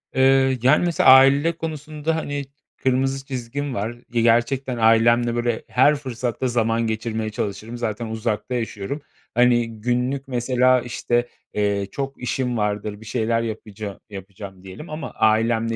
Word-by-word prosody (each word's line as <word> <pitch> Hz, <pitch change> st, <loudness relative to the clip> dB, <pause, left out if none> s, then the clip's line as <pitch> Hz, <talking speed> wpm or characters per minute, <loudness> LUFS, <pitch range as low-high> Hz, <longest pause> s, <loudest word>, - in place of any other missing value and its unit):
Eee, 130 Hz, 0 st, +4 dB
yani, 140 Hz, +7 st, +4 dB
mesela 170 Hz, -5 st, +3 dB
aile 135 Hz, +4 st, +7 dB
konusunda, 155 Hz, 0 st, -3 dB
hani, 145 Hz, -3 st, -3 dB, 0.3 s
kırmızı 135 Hz, +1 st, 0 dB
çizgim 135 Hz, +1 st, -4 dB
var. 105 Hz, +1 st, -2 dB, 0.2 s
Ya, 115 Hz, -, +2 dB
gerçekten 120 Hz, +3 st, +2 dB
ailemle, 115 Hz, +1 st, +4 dB
böyle, 120 Hz, -1 st, -1 dB
her 145 Hz, +4 st, +4 dB
fırsatta 130 Hz, -2 st, -3 dB
zaman 115 Hz, -1 st, +1 dB
geçirmeye 110 Hz, 0 st, -2 dB
çalışırım, 110 Hz, +1 st, -5 dB
zaten 115 Hz, -1 st, -3 dB
uzakta 110 Hz, +2 st, -3 dB
yaşıyorum. 115 Hz, +4 st, -4 dB, 0.3 s
Hani, 120 Hz, -2 st, +2 dB
günlük 125 Hz, +3 st, -1 dB
mesela, 125 Hz, 0 st, +2 dB
işte, 120 Hz, 0 st, -1 dB, 0.3 s
eee, 100 Hz, -1 st, 0 dB
çok 135 Hz, -1 st, -5 dB
işim 125 Hz, -1 st, -1 dB
vardır, 105 Hz, 0 st, -2 dB
bir 110 Hz, -, -12 dB
şeyler 115 Hz, 0 st, 0 dB
yapaca 105 Hz, -3 st, -6 dB
yapacağım 95 Hz, -1 st, -10 dB
diyelim 95 Hz, -, -10 dB
ama 155 Hz, +1 st, -6 dB
ailemle, 115 Hz, +1 st, +2 dB
120 Hz, 135 wpm, -22 LUFS, 110-130 Hz, 0.3 s, aile